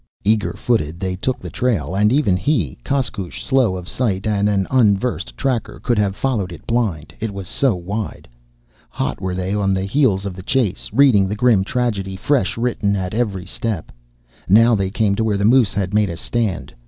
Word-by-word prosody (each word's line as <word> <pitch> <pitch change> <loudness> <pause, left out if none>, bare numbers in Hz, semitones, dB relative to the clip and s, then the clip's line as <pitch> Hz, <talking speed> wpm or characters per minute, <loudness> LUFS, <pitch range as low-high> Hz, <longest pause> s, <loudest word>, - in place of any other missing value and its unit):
Eager 105 0 +1
footed, 85 -9 -1
they 95 0 -2
took 125 +7 -2
the - - -8
trail, 100 - -1
and 105 +2 +3
even 130 -9 +3
he, 90 - -1
Koskoosh, 110 - -2
slow 130 -8 +2
of 90 -1 -8
sight 100 -6 -1
and 105 -1 +1
an 100 -2 +1
unversed 120 -2 +1
tracker, 130 -4 -2
could 120 -4 0
have 100 -2 +1
followed 105 -7 -1
it 85 - -11
blind, 105 -11 -1
it 110 +2 -2
was 100 -2 -7
so 130 +1 +1
wide. 100 +4 -5 0.6
Hot - - -3
were 95 -1 -2
they 95 +1 -2
on 100 -2 +1
the 95 - -1
heels 100 -4 +2
of 95 -2 -4
the 95 - -8
chase, 110 -2 -1
reading 120 -9 +4
the 105 - -2
grim 110 -4 +3
tragedy, 105 -4 -2
fresh 120 +1 0
written, 115 -4 0
at 95 -1 -3
every 105 -6 -1
step. 105 -2 -4 0.6
Now 115 +4 +6
they 100 -3 +1
came 105 0 +1
to 110 +3 0
where 105 -2 +1
the 100 - 0
moose 115 -3 +4
had 100 -1 -1
made 105 -1 +3
a 85 - -5
stand. 110 -2 -2
105 Hz, 195 wpm, -20 LUFS, 95-120 Hz, 0.6 s, Now